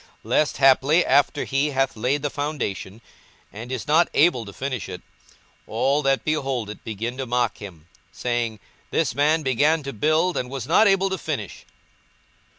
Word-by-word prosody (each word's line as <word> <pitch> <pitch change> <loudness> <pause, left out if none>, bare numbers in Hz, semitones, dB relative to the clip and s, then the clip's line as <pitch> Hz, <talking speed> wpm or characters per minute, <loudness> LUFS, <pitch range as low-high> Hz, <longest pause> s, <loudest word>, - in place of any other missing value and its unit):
42:014:029 - - -26
Lest 155 - +1
haply, 135 +5 +4
after 140 +2 +2
he 140 +2 0
hath 135 -2 0
laid 130 +6 -1
the 145 - -1
foundation, 130 -8 -4 0.5
and 115 +5 -8
is 130 +2 -4
not 160 +4 +4
able 145 -7 +3
to 100 - -9
finish 130 -1 -4
it, 90 -1 -8 0.6
all 135 +6 +1
that 135 -1 +1
behold 135 -8 -1
it 105 - -12
begin 115 +3 -5
to 135 - -3
mock 120 -2 0
him, 90 -7 -10 0.3
42:014:030 - - -29
Saying, 120 -3 -2 0.3
This - - 0
man 150 +4 +2
began 145 +4 +2
to 140 0 -5
build, 155 - +1
and 125 - -3
was 135 -3 -5
not 215 +10 +4
able 195 -1 +2
to 190 - -2
finish. - - -5
135 Hz, 175 wpm, -23 LUFS, 115-150 Hz, 0.6 s, haply